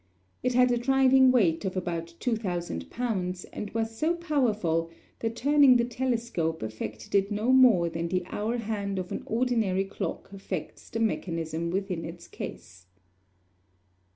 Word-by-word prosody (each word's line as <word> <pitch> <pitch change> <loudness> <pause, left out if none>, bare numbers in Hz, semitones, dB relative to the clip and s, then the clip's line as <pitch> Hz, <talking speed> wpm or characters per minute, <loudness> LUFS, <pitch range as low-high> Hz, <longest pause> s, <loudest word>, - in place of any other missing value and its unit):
It 250 0 0
had 250 0 +5
a 240 - +2
driving 265 +1 +5
weight 190 -10 +3
of 190 -1 -3
about 170 -2 -3
2,000 175 - -2
pounds, 185 -7 -2
and 210 - -5
was 225 +1 -2
so 315 +8 +1
powerful 215 - 0 0.3
that 225 0 -2
turning 280 0 +5
the 235 - +2
telescope 235 - -1
affected 110 0 -6
it 200 0 +3
no 215 +4 +1
more 245 -10 +6
than 165 0 -3
the 180 +1 -1
hour 220 +6 -2
hand 205 -3 -3
of 180 -1 -4
an - - -3
ordinary 225 -5 +1
clock 195 0 -5
affects 190 -4 -6
the 225 - -3
mechanism 165 -6 -1
within 185 -2 -2
its 170 +1 -8
case. 90 0 -9
205 Hz, 150 wpm, -28 LUFS, 170-245 Hz, 0.3 s, more